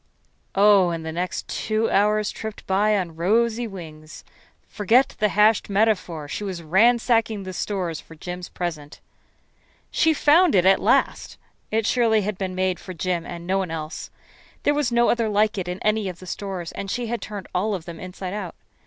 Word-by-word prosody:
Oh, 200 -2 +5
and 165 -1 -4
the 160 - -3
next 180 +3 -3
two 220 +1 -1
hours 210 +1 +2
tripped 220 -1 -7
by 205 +2 +2
on 175 -4 -3
rosy 230 +7 +1
wings. 155 -6 -10 0.4
Forget 230 +6 +2
the 210 0 +3
hashed 210 +2 +3
metaphor. 195 -7 0
She 175 - -5
was 185 -4 -5
ransacking 225 +3 +3
the 185 0 -6
stores 180 -4 -3
for 165 - -15
Jim's 180 +2 -7
present. 160 -5 -5 0.9
She 320 - +3
found 315 - +5
it 180 -1 +4
at 195 0 +5
last. - - +1 0.3
It 220 0 0
surely 225 -2 +3
had 205 -1 -3
been 185 -2 -3
made 185 -1 0
for 185 - -9
Jim 175 0 -2
and 170 -1 -7
no 190 +2 +1
one 190 -3 -2
else. 160 -1 -6 0.5
There 290 - +3
was 290 -4 0
no 235 0 +3
other 230 -2 0
like 210 0 +2
it 180 - -4
in 180 0 -3
any 215 -2 +1
of 180 - -8
the 185 - -12
stores, 185 -2 -5
and 195 - -6
she 245 +4 -2
had 235 +1 -3
turned 205 -3 -7
all 205 +3 0
of 170 -4 -7
them 170 -2 -8
inside 185 0 -6
out. 200 -5 -5
195 Hz, 190 wpm, -23 LUFS, 180-220 Hz, 0.9 s, Oh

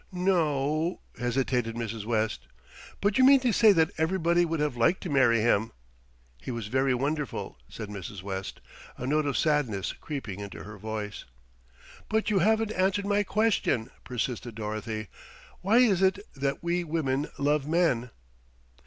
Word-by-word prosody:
"Noooo 165 -3 +1
" - - -23
hesitated 125 -1 0
Mrs. 115 -2 -4
West. 110 -1 -1 0.5
"But 205 +4 +2
you - - +6
mean 270 +1 +8
to 250 -2 +2
say 220 0 +6
that 160 -4 +3
everybody 170 +1 +2
would 165 -1 -2
have 150 -4 0
liked 120 +10 +2
to 175 - -4
marry 120 -5 +4
him." 110 -1 +2 0.7
"He - - -8
was 115 -3 -3
very 130 +1 +2
wonderful," 140 - -3
said 110 - -7
Mrs. 100 -2 -7
West, 95 -1 -5 0.4
a 125 - -5
note 150 +2 +1
of 140 - 0
sadness 140 - 0
creeping 130 - -6
into 100 -2 -7
her 105 0 -10
voice. 105 0 -5 0.8
"But 220 0 +1
you 200 - +3
haven't 220 +3 +2
answered 195 0 +1
my 205 0 +2
question," 205 - +1
persisted 120 -1 -4
Dorothy. 110 0 -4 0.5
"Why 200 +6 +3
is 215 -7 +4
it 190 +1 +4 0.2
that 140 +2 -2
we 175 +1 0
women 150 -3 -1
love 145 0 +1
men?" 155 -8 +1
140 Hz, 155 wpm, -28 LUFS, 115-180 Hz, 0.8 s, mean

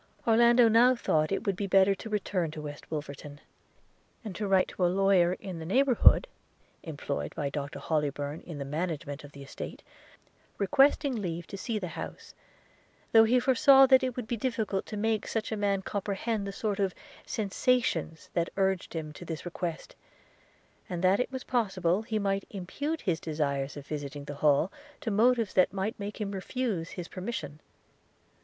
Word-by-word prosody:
Orlando 235 +1 +6
now 240 +3 +5
thought 155 -9 +1
that 195 - +1
it - - -5
would 200 - +1
be 200 +2 -3
better 195 +1 +5
to 210 +3 -8
return 195 -5 -1
to 155 0 -7
West 145 -1 -8
Wolverton, 145 -1 -6 0.9
and 200 -4 -6
to 210 +1 -2
write 190 -1 +4
to 185 - -3
a - - +5
lawyer 185 -1 +3
in 185 -2 -7
the - - -6
neighbourhood, 260 - +5 0.5
employed 140 - -4
by 140 -2 -2
Dr 140 0 -4
Hollybourn 145 -1 -2
in 165 -4 -8
the 140 - -4
management 150 -1 -4
of 145 - -11
the 140 - -10
estate, 135 - -8 0.7
requesting 275 +5 +3
leave 175 -6 -3
to 195 - -8
see 215 +3 -3
the 185 -4 -4
house; 160 - -8 0.8
though 225 0 +7
he 250 +3 +4
foresaw 270 +2 +6
that 260 0 +6
it 255 -2 -2
would 250 - -4
be 235 - -2
difficult 220 -5 -2
to 210 - -5
make 220 0 0
such 225 -1 -2
a - - 0
man 200 -2 0
comprehend 200 +2 -2
the - - -3
sort 205 0 -2
of 195 -2 0 0.3
sensations 200 -6 0
that 170 0 0
urged 190 -3 0
him 155 -2 -4
to 165 - -10
this 165 -1 -6
request 175 -2 -5 0.5
– - - -34
and 175 -1 -4
that 185 +2 +4
it 250 - -1
was 260 -1 -5
possible 190 -6 0
he 220 -1 -3
might 195 -1 -1
impute 285 - -4
his 170 -4 0
desire 145 -4 -1
of 140 +1 -10
visiting 145 -1 -5
the 145 - -6
Hall 150 +5 +3 0.3
to 235 -6 -2
motives 230 0 +3
that 185 - +4
might 200 +3 -3
make 205 +2 -6
him 205 -2 -3
refuse 200 -3 -3
his 175 -1 -7
permission. 185 -7 -5
195 Hz, 180 wpm, -29 LUFS, 160-225 Hz, 0.9 s, though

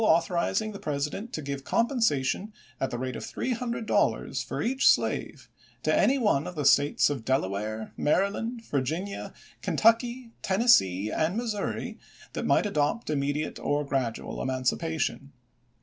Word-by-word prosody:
authorizing 180 +3 +2
the 200 - -8
President 150 +10 -3
to 155 - -4
give 140 -1 -4
compensation 220 - +1 0.3
at 135 - 0
the 120 - -4
rate 130 0 -3
of - - -6
three 260 - -3
hundred 235 -1 -2
dollars - - +1
for - - -5
each 260 +3 +2
slave - - +1 0.4
to - - +2
any 275 - +4
one 205 - +2
of 180 - -7
the 150 -2 -2
States 145 +1 +4
of 135 -6 -4
Delaware, 110 -3 -2
Maryland, 210 +8 0
Vir 140 - 0
ginia, 175 +9 -4 0.3
Kentucky, 235 +2 +2
Tennessee, 110 - +3
and 165 +6 0
Missouri 225 -4 -3 0.3
that - - -3
might - - +3
adopt 155 +1 0
immediate 145 +1 -1
or 145 0 0
gradual 130 -5 -2
emancipation. 135 +2 -1
155 Hz, 145 wpm, -28 LUFS, 135-225 Hz, 0.4 s, any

